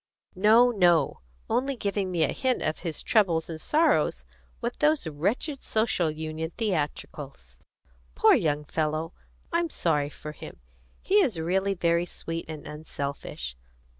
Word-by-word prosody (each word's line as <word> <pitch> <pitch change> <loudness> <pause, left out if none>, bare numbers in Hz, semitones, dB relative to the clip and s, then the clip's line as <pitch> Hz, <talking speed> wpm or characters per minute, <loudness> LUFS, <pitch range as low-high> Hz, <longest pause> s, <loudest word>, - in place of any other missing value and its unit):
"No, 220 +6 +5
no! 175 -6 +3 0.3
Only 270 +2 0
giving 200 -4 -1
me 170 -3 +1
a 150 - +2
hint 260 -1 0
of 155 - -1
his 165 -4 -4
troubles 170 -7 +2
and 160 -1 -6
sorrows 320 +2 +2 0.3
with 240 0 -4
those 300 -6 +3
wretched 200 - -2
Social 220 -7 +1
Union 155 +1 -4
theatricals. 145 - -4 0.6
Poor - - +6
young 150 -1 +1
fellow! 155 +2 -2 0.4
I'm 340 0 +1
sorry 150 - 0
for 150 +1 -8
him. 150 - -10 0.4
He 410 +2 +4
is 230 - +1
really 190 +4 0
very 170 0 +1
sweet 165 0 -5
and 155 -2 -7
unselfish. 140 - -5
170 Hz, 135 wpm, -27 LUFS, 155-220 Hz, 0.6 s, Poor